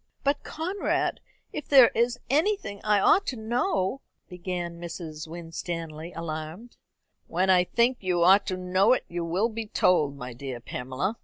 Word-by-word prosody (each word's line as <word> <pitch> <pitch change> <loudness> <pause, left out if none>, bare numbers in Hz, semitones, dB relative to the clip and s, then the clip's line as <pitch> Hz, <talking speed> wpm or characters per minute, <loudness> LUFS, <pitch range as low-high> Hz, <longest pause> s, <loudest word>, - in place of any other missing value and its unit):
"But, 285 +1 +1
Conrad, 365 +6 -2 0.3
if 300 - -5
there 265 -4 +8
is 240 +1 0
anything 300 - 0
I 210 -1 +3
ought 390 - +4
to 260 - -2
know 240 - -1
" - - -47
began 175 -1 -5
Mrs. 165 -2 -7
Winstanley, 165 -1 -6
alarmed. 165 +7 -6 0.5
"When 185 +3 +2
I 180 -1 +5
think 240 +5 +2
you 180 -3 +1
ought 195 +3 +6
to 185 - -2
know 185 +4 +3
it 255 - -1
you 175 0 -4
will 180 +7 0
be 225 -1 -5
told, 150 -9 +2
my 125 -2 -7
dear 130 0 -6
Pamela. 130 - -4
185 Hz, 160 wpm, -27 LUFS, 165-235 Hz, 0.5 s, there